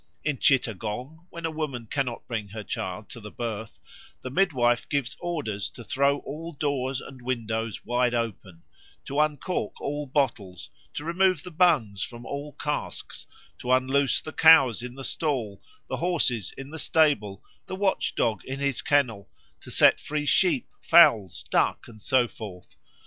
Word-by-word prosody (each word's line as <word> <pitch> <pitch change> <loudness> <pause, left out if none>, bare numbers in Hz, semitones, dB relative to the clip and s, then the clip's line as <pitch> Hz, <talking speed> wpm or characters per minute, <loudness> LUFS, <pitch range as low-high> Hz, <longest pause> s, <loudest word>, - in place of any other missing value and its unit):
In 145 -5 -1
Chittagong, 125 - 0
when 170 0 -6
a 160 - -1
woman 145 -7 -4
cannot 125 0 -3
bring 110 -4 -3
her 105 +2 -7
child 105 -2 -4
to 120 - -8
the 105 -1 -9
birth, 110 -1 -5 0.5
the 130 - -5
midwife 130 -9 +2
gives 140 -4 -1
orders 150 - -3
to 120 - -11
throw 140 +5 +2
all 165 +4 -7
doors 135 -3 -1
and 130 -2 -11
windows 115 -3 -3
wide 120 +1 +1
open, 95 -7 -4 0.4
to 140 +2 -2
uncork 150 - -1
all 145 0 -3
bottles, 110 - -2 0.2
to 145 - -4
remove 180 -1 +2
the 180 - -8
bungs 155 - +2
from 120 0 -6
all 145 +2 -5
casks, 150 -1 -4 0.3
to 125 - -2
unloose 130 +2 +3
the 155 - -8
cows 160 -8 +7
in 125 0 -7
the 135 - -8
stall, 125 - -2 0.3
the - - -3
horses 150 - 0
in 135 +1 -8
the 160 - -6
stable, 140 -14 +2 0.2
the - - -4
watchdog 190 - 0
in 135 +1 -4
his 140 -2 0
kennel, 125 -9 +1 0.3
to - - -12
set - - +5
free 150 0 -3
sheep, 285 - +3
fowls, 115 - +5
ducks, - - +1
and 110 -3 -14
so 130 +1 +3
forth. 100 -7 -10
130 Hz, 160 wpm, -26 LUFS, 115-150 Hz, 0.5 s, cows